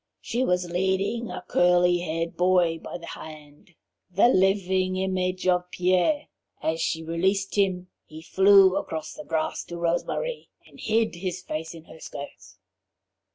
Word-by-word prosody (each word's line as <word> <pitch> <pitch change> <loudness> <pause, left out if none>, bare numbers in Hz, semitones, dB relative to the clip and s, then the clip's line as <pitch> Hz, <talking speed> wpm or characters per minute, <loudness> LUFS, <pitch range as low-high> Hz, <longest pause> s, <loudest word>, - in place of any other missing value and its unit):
She 245 +2 -2
was 180 -6 0
leading 190 +6 0
a - - -6
curly 175 0 +3
haired 165 0 -3
boy 180 -2 +2
by - - -7
the 170 - -11
hand, 155 +1 -11 0.3
the 195 +6 +4
living 190 -2 +2
image 185 -1 -1
of 180 0 +2
Pierre. 185 - +1 0.3
As 160 +1 -1
she 160 0 -1
released 190 +4 0
him 185 -3 0 0.2
he 155 +1 -11
flew 195 +1 +6
across 160 -5 -4
the 205 - -9
grass 160 -4 -2
to 170 - -7
Rose 170 0 0
Marie - - -4 0.2
and - - -18
hid 220 -4 0
his 180 0 -4
face 160 +1 -5
in 165 - -12
her 160 - -14
skirts. 140 -2 -10
180 Hz, 155 wpm, -25 LUFS, 165-190 Hz, 0.3 s, flew